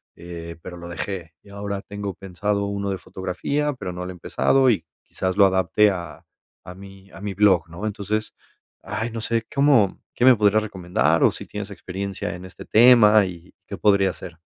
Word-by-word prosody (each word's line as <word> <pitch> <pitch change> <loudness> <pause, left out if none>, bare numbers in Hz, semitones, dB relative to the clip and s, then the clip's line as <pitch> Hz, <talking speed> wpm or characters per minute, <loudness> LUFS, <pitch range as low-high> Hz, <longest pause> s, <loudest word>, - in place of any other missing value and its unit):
eh 85 -1 -9
pero 90 -1 -8
lo 85 0 -9
dejé 85 -2 -5
y - - -18
ahora 100 0 -5
tengo 100 -1 -5
pensado 100 +2 -2
uno 100 0 -3
de 95 - -2
fotografía, 140 +11 -3
pero 90 -8 -6
no 90 +1 -5
lo 90 - -6
he - - -8
empezado 135 +8 +2
y 115 - +1 0.2
quizás 95 +1 -3
lo 100 - +7
adapte 95 +2 +3
a 90 -2 -7 0.4
a 90 - -8
mi 95 0 -14
a - - -12
mi 100 -1 -4
blog, 95 -3 +3
¿no?, 85 +6 -7
entonces, 105 +1 -3 0.5
ay, 115 +2 -3
no 115 - -5
sé, 115 +1 -1
cómo, 140 -8 +3 0.2
¿qué 120 - -1
me 130 - +9
podría 105 0 +3
recomendar?, 90 -6 0
o - - +6
si - - -9
tienes 105 -1 -6
experiencia 95 -1 -5
en 90 +1 -10
este 95 - -11
tema 110 -3 +6
y 85 -2 -10
qué - - -5
podría 100 -2 +3
hacer. 85 -2 -10
100 Hz, 195 wpm, -23 LUFS, 90-105 Hz, 0.5 s, me